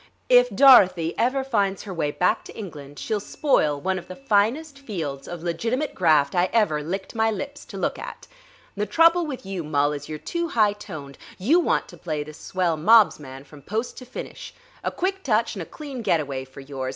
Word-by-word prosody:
If - - +6
Dorothy 185 -11 +6
ever 260 +3 +1
finds 200 -7 0
her 195 - -7
way 160 -4 -1
back 180 +5 +1
to - - -11
England 145 -9 -9
she'll 215 -2 -2
spoil 155 - +1
one 190 +5 -1
of - - -14
the 185 - -8
finest 275 +5 0
fields 165 - -5
of 175 -1 -7
legitimate 230 - -2
graft 155 -5 +3
I 180 +1 +2
ever 205 -10 +2
licked 190 +6 -5
my 225 -1 +2
lips 285 +6 -5
to - - -9
look - - -2
at. - - -8 0.5
The 210 +1 -2
trouble 330 - +4
with 260 -8 -6
you, 190 -3 -4
Mul, 145 -1 +1
is 145 - -7
you're 155 - -4
too 340 - -3
high 215 -8 +3
toned. 145 -9 -9 0.2
You 280 - +3
want 350 - +1
to - - -12
play 155 -3 -3
the 155 +1 -11
swell 175 +1 -1
mobs 215 +5 +5
man 135 -2 -10
from 145 0 -15
post 220 - -3
to 255 - -11
finish. 255 - -8 0.3
A - - 0
quick 385 +1 -2
touch 230 - +1
and 195 - -6
a 165 - -7
clean 280 -5 -7
getaway 145 -10 -1
for 130 +1 -12
yours. 135 -1 -5
195 Hz, 205 wpm, -24 LUFS, 155-250 Hz, 0.5 s, If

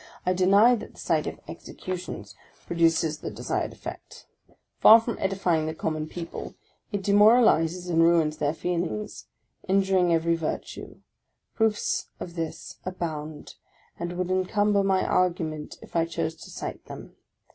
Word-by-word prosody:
I 185 - +2
deny 200 +6 +5
that 235 - -4
the - - -15
sight - - 0
of - - -5
executions 180 - -7 0.3
produces 165 -2 +1
the - - -5
desired - - -3
effect. - - -10 0.5
Far 225 +1 +9
from 230 +1 -4
edifying 180 -5 0
the 160 - -4
common 155 -1 -2
people, 170 0 -7 0.4
it 200 -2 -3
demoralizes 200 -5 +4
and 165 -2 +2
ruins 165 -2 +3
their 150 +1 0
feeling, 180 +5 -2 0.6
injuring 190 -2 +3
every 165 0 +2
virtue; 165 -2 -5 0.5
proofs 220 -2 0
of 170 - -7
this 165 -2 -6
abound 155 -4 -5 0.5
and 175 +1 -3
would 180 0 -2
encumber 200 +2 +2
my 195 -1 +2
argument 165 -4 -1
if - - -15
I 165 -1 +3
chose 160 -1 -3
to - - -12
cite - - -7
them. - - -10
175 Hz, 140 wpm, -26 LUFS, 165-195 Hz, 0.6 s, Far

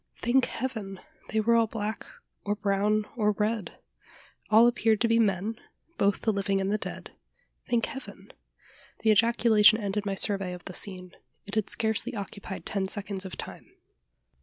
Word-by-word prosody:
Thank 250 +2 +2
Heaven! 220 -7 -5 0.3
they 220 - 0
were 235 +2 +3
all 230 -1 +4
black, 215 0 -4 0.4
or 205 0 -1
brown, 205 +1 +1
or 210 -3 +2
red! 210 0 -2 0.7
All 220 +2 +7
appeared 225 -3 +2
to 235 - +4
be 230 0 +3
men 210 +1 0 0.4
both 200 0 +2
the 220 - +1
living 195 0 0
and 195 +1 -1
the 215 - 0
dead - - -7 0.6
thank 240 -2 +2
Heaven! 270 - -10 0.7
The 220 - +5
ejaculation 220 -1 +5
ended 205 -1 -2
my 195 - -1
survey 195 -2 0
of 180 - -10
the 185 - -7
scene: 185 -1 -3 0.3
it 200 - -10
had 215 -2 0
scarcely 225 +2 -1
occupied 200 -1 -7
ten 195 -1 -1
seconds 200 -1 -4
of 190 - -7
time. - - -9
210 Hz, 160 wpm, -28 LUFS, 195-225 Hz, 0.7 s, All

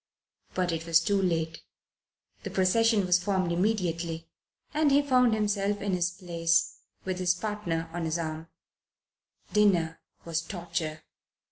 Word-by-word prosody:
But 180 -1 +1
it 165 0 -4
was 165 -1 +6
too 200 +4 +1
late. 165 -3 -1 0.8
The - - -5
procession 210 +2 +3
was 180 0 +3
formed 185 -3 0
immediately, 170 -4 -1 0.5
and 305 0 +3
he 285 +1 +4
found 250 -4 +4
himself 205 -1 0
in 200 -1 -2
his 180 -1 +1
place 170 -2 0 0.3
with 185 -1 -2
his 180 -1 +2
partner 180 -5 -3
on 175 -1 -2
his 160 +1 -1
arm. 160 -1 -4 1.1
Dinner 175 -6 +3 0.3
was 165 -1 -1
torture. 170 -4 -4
180 Hz, 135 wpm, -28 LUFS, 165-205 Hz, 1.1 s, was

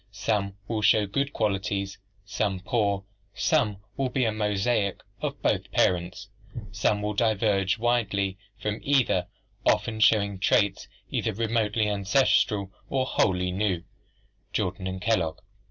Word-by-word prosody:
Some 100 -2 -1
will 110 -2 -1
show 105 0 +4
good 140 +8 -1
qualities, 100 -3 -1 0.3
some 100 -1 -1
poor, 100 -1 0 0.3
some 120 -11 +2 0.2
will 135 -1 -1
be 125 0 +1
a 110 - +2
mosaic 105 0 0 0.2
of - - -3
both - - +1
parents, 90 +3 +1 0.4
some 105 0 0
will 105 0 -1
diverge 100 -3 +2
widely 105 -5 0 0.2
from 105 0 -2
either, 125 -10 +2 0.4
often 110 -1 +1
showing 100 -3 +3
traits 100 0 +2 0.2
either 110 - -1
remotely 110 -1 +1
ancestral 100 -1 +2 0.2
or 130 -1 +1
wholly 90 -7 +1
new" 95 -2 0 0.7
(Jordan 95 +1 -2
and 95 0 -5
Kellogg). 95 -8 +1
105 Hz, 125 wpm, -26 LUFS, 95-110 Hz, 0.7 s, show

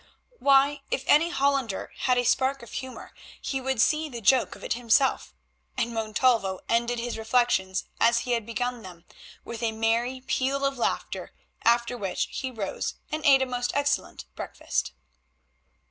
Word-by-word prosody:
Why, 280 +1 +4
if 270 - -1
any 330 +3 +5
Hollander 275 - 0
had 250 -1 +1
a 245 - +2
spark 265 +2 +1
of 235 - -12
humour 260 -1 -7 0.3
he 270 -1 -3
would 265 -2 -2
see 310 +6 +2
the 240 -4 -6
joke 250 +4 +3
of - - -14
it - - 0
himself—and 235 0 -1
Montalvo 220 -3 +1
ended 235 +1 +1
his 235 -1 -4
reflections 220 -5 +1 0.2
as 235 0 +4
he 245 - -4
had 235 -2 +1
begun 245 +2 -3
them, 180 -4 -12 0.4
with 235 0 -7
a 230 -1 +1
merry 230 +3 0
peal 270 +1 0
of 275 0 0
laughter, - - -2 0.3
after 235 +1 +3
which 195 -3 -2
he 260 - -3
rose 220 -6 -4 0.2
and 310 0 -3
ate 270 -1 +6
a - - 0
most 245 -1 -2
excellent 285 0 -1
breakfast. - - -3
245 Hz, 160 wpm, -26 LUFS, 230-270 Hz, 0.4 s, ate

